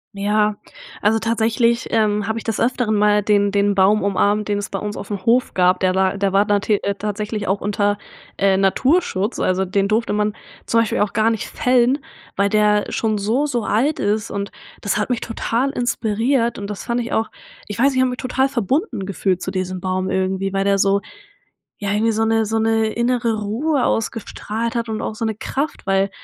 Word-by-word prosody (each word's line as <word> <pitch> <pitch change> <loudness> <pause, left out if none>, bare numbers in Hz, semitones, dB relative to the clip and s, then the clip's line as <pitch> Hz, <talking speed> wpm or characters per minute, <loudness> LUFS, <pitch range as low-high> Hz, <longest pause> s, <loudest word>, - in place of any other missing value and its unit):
Ja, 210 +1 +1 0.5
also 220 +2 +3
tatsächlich, 230 +1 +1
ähm, 210 -2 +1
hab 220 - -1
ich 230 - -5
des 225 -2 -2
Öfteren 240 -2 +1
mal 210 0 +3
den 205 0 +2
den 200 0 +2
Baum 200 +2 +4
umarmt, 205 +1 +1
den 205 -1 0
es 205 +1 -5
bei - - -2
uns 210 0 -5
auf - - -7
dem 200 -2 -4
Hof 245 +2 +2
gab. 180 0 +3
Der 185 0 +2
war 190 +1 +1
der 195 -1 0
war 200 +1 +3
te 210 -1 +1
äh, 200 0 -1
tatsächlich 210 +1 -4
auch 195 +2 0
unter, 205 0 0 0.4
äh, 195 -1 +3
Naturschutz, 205 - +1
also 185 +1 +1
den 195 +1 0
durfte 220 +2 0
man 210 0 0 0.3
zum 230 - +2
Beispiel 230 - 0
auch 205 -1 0
gar 220 +1 +3
nicht 225 -2 -2
fällen, 250 +2 +2 0.4
weil 200 +1 +2
der 210 0 +3
schon 215 -2 0
so, 225 +8 +1
so 245 -6 -1
alt 275 +8 +1
ist 210 +1 -1
und 200 0 -4 0.3
das 200 - -1
hat 210 +4 -1
mich 240 - -1
total 235 +3 -1
inspiriert 235 0 0
und 200 0 -5
das 205 - -6
fand 240 +1 0
ich 235 - -5
auch 220 - 0 0.4
ich 205 - -6
weiß 265 +4 +4
nicht 265 - -3
ich - - +4
hab 260 - +3
mich 250 - -4
total 265 +1 0
verbunden 260 - -1
gefühlt 190 -1 -1
zu 190 - -3
diesem 185 -1 -3
Baum 185 0 -2
irgendwie, 190 +1 -1
weil 195 0 +1
der 200 0 +2
so 200 +1 +3 0.8
ja, 200 -1 -2
irgendwie 220 +2 +2
so 220 +1 +1
'ne 225 0 +2
so 220 +1 -1
'ne 225 0 +2
innere 235 +1 0
Ruhe 250 +8 0
ausgestrahlt 225 0 -2
hat 235 0 -1
und 220 0 -3
auch - - -3
so 225 +1 -3
'ne 220 -1 -1
Kraft, 280 +6 -4
weil 195 0 +2
210 Hz, 210 wpm, -20 LUFS, 200-230 Hz, 0.8 s, Baum